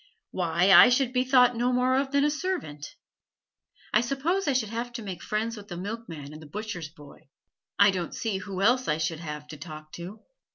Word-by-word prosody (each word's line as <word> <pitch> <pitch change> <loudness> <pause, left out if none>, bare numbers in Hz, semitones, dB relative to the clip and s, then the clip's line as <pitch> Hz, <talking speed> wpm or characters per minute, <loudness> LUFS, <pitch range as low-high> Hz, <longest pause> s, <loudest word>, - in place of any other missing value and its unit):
Why 175 +1 +2
I 190 - +10
should 255 0 +2
be 250 0 +2
thought 250 -1 +4
no 245 +2 +1
more 250 +1 +2
of 270 0 0
than 280 0 +3
a 295 - +3
servant. 305 - -4 1.0
I 215 - +5
suppose 290 +9 -1
I 280 - +3
should 240 -5 0
have 235 +1 -4
to 235 -2 -6
make 185 -4 -6
friends 220 +2 -2
with 205 -2 -11
the 175 - -7
milkman 180 -7 -7
and 155 - -10
the 155 - -11
butcher's 175 -2 -6
boy; 145 -3 -16 0.5
I 200 0 +6
don't 180 -3 -4
see 215 -4 -2
who 195 0 -4
else 250 +4 +3
I 150 - +1
should 160 0 -2
have 150 -2 -7
to 155 - -8
talk 155 0 -10
to. 185 +5 -9
210 Hz, 210 wpm, -27 LUFS, 165-250 Hz, 1.0 s, I